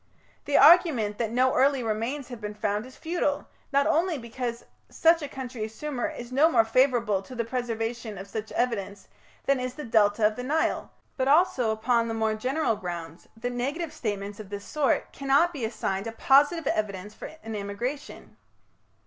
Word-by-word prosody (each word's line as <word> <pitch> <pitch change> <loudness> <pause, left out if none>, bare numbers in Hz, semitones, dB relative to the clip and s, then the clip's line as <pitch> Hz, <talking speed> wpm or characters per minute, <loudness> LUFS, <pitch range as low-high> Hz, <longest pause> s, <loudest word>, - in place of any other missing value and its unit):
The 285 - +2
argument 285 - +6
that 230 -2 0
no 255 +3 +2
early 270 -1 +3
remains 230 +5 -2
have 240 -3 -8
been 210 0 -5
found 210 +2 -2
is 255 - -14
futile, 320 -3 -1 0.2
not 280 0 +3
only 335 +1 +2
because 235 0 -5 0.2
such 330 0 +4
a 290 - -3
country 250 -4 -6
as 220 0 -10
Sumer 290 -3 -3
is 240 0 -8
no 290 +5 +5
more 230 -8 +4
favourable 235 -4 +2
to 250 +6 -11
the 235 -1 -1
preservation 230 -2 -3
of 195 +1 -8
such 215 +2 -6
evidence 205 -5 -2 0.4
than 275 -1 +2
is 255 0 -4
the 300 - -6
Delta 215 -2 +3
of 215 0 +2
the 250 - -4
Nile, 300 +5 0 0.3
but 260 -1 0
also 280 -6 +4
upon 230 +2 +1
the 225 - -3
more 220 -1 +1
general 255 +3 0
grounds 170 -3 -7
that 245 +2 -3
negative 290 +7 -3
statements 205 -7 -4
of 210 -3 -9
this 200 0 -6
sort 295 -3 0
cannot 280 +5 +2
be 275 -6 -5
assigned 195 -3 -2
a - - -3
positive 285 +7 +3
evidence 210 -3 -2
for - - -8
an 225 - -6
immigration." 215 +8 -5
240 Hz, 185 wpm, -27 LUFS, 215-275 Hz, 0.4 s, argument